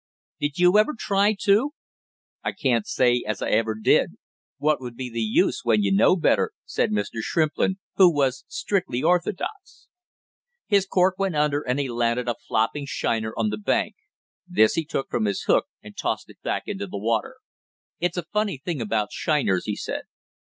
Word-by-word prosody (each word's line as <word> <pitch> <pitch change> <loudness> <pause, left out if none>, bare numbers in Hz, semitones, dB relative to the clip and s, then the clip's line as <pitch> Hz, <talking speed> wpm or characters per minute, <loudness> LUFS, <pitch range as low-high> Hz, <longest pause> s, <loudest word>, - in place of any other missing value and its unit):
"Did 145 0 -2
you 180 +3 +5
ever 230 +7 +2
try 205 0 +2
to?" 220 +9 +3 0.7
"I - - -2
can't 120 -5 0
say 125 -1 +2
as 105 -3 -2
I - - -2
ever 110 0 +1
did. 110 - +2 0.4
What 150 -1 +1
would 120 -2 -7
be 125 0 -6
the 115 0 -3
use 110 -1 +2
when 110 -3 +3
you 100 - +1
know 100 - +5
better?" 175 - +2
said - - 0
Mr. 105 +2 -2
Shrimplin, 160 +7 0 0.2
who 185 -3 +7
was 135 -4 0
strictly 195 - -2
orthodox. 180 - -2 0.8
His 200 -3 +2
cork 185 0 +2
went 195 -4 0
under 150 -1 +1
and 125 0 -1
he 140 - -1
landed 120 0 0
a 120 - +1
flopping 115 +6 0
shiner 110 -4 -2
on 110 -2 +1
the 105 0 -4
bank; 105 - 0 0.5
this 110 0 +4
he 165 - -1
took 145 -3 -3
from 110 - 0
his 100 -2 -1
hook - - +2 0.2
and - - -12
tossed - - -3
back - - -2
into 200 0 -4
the - - -6
water. 110 +2 -1 0.6
"It's 175 +1 -1
a 175 - -1
funny 210 -6 0
thing 145 0 -4
about 110 -1 -1
shiners!" 130 - 0
he 105 - -2
said. - - -5
135 Hz, 180 wpm, -24 LUFS, 115-180 Hz, 0.8 s, who